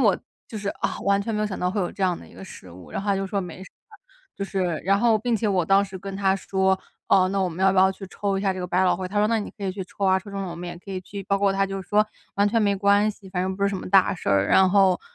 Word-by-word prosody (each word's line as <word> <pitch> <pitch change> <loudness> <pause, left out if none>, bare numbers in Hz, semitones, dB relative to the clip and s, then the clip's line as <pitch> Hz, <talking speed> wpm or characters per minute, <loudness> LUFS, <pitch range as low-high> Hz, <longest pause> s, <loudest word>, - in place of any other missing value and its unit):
我， - - +4 0.3
就 220 - -8
是， 205 -1 -4
啊， - - -3
完 200 0 +2
全 220 +2 -3
没 210 - -1
有 215 - +1
想 190 - -5
到 180 - 0
会 200 +3 -1
有 180 - -1
这 - - -14
样 180 -2 +1
的 - - -13
一 - - -18
个 - - -10
失 95 - -12
误， 90 0 -13
然 - - -3
后 205 - -5
他 200 - +2
就 195 0 -2
说 200 +1 -1
没 180 -1 -8
事， - - -13 0.7
就 200 - -3
是， 185 -5 -2
然 195 +2 +3
后 230 -2 +4
并 230 +2 0
且 215 0 -1
我 185 -3 +1
当 195 +3 +4
时 190 -1 -8
跟 195 +1 -7
他 195 -1 +2
说： 190 -1 +1 0.3
“哦， 185 -1 +5
那 195 0 0
我 185 - +1
们 180 +3 -2
要 190 - +5
不 190 - +1
要 190 0 +6
去 195 0 -10
抽 195 0 -2
一 - - -4
下 195 -2 +2
这 185 - -6
个 180 - -3
百 180 +1 +2
老 180 - +3
汇？” 185 +1 -4
他 205 - -7
说： 210 - +4
“那 230 0 +2
你 210 - -5
可 200 - -6
以 190 - -1
去 190 0 -5
抽 195 +2 -5
啊， 190 0 +4
抽 190 +2 -11
中 195 0 -4
了 190 - -4
我 170 - -7
们 175 +1 -6
也 175 - -7
可 195 - -12
以 185 -1 -3
去。” 200 +2 -8
包 200 +1 +1
括 200 -1 +2
他 195 0 +1
就 195 0 -5
说： 210 +3 +2 0.3
“完 200 +1 +3
全 225 +2 +1
没 200 -1 +2
关 200 +2 +3
系， 200 -2 -14
反 180 -1 -1
正 190 0 -2
不 200 - -4
是 200 - +4
什 200 - -3
么 - - -7
大 195 -1 +5
事 170 - -6
儿， 100 0 +3
然 190 0 +5
后， 195 -2 +4
195 Hz, 370 characters per minute, -24 LUFS, 185-200 Hz, 0.7 s, 要